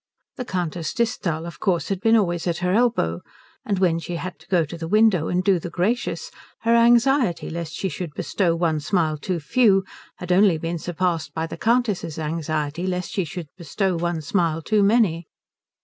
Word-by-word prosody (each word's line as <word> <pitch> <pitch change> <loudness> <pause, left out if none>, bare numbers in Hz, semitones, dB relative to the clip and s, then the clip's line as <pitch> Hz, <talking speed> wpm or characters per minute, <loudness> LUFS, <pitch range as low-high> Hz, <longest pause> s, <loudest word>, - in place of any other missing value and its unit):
The 250 - -4
Countess 175 -5 -3
Disthal, 185 -9 -1
of 170 - -9
course, 180 -5 0
had 195 -2 -1
been 225 +2 +4
always 175 -4 0
at 170 -1 0
her 180 - +1
elbow, 220 - +1 0.4
and 200 - -1
when 175 -3 +2
she 175 +1 -5
had 185 +2 -6
to - - -20
go 180 -4 +2
to 160 - -8
the 165 -1 -5
window 210 -4 +3
and 180 +1 0
do 190 -2 +3
the 175 - -6
gracious 210 +9 -1 0.3
her 230 0 +2
anxiety 235 - +3
lest 165 -1 -5
she 195 - -2
should 175 -4 -6
bestow 175 -4 0
one 165 -2 0
smile 155 -1 0
too 180 +2 -2
few 195 - +3 0.3
had 180 0 -6
only 185 -2 +5
been 165 +1 -3
surpassed 175 -1 -2
by 160 0 -1
the - - -7
Countess's 220 -9 0
anxiety 155 +1 -2
lest 180 -1 -3
she 190 - -1
should 165 0 -7
bestow 185 +2 -1
one 170 -1 -2
smile 165 0 0
too 215 +4 +2
many. 200 -6 +2
175 Hz, 190 wpm, -23 LUFS, 165-200 Hz, 0.4 s, only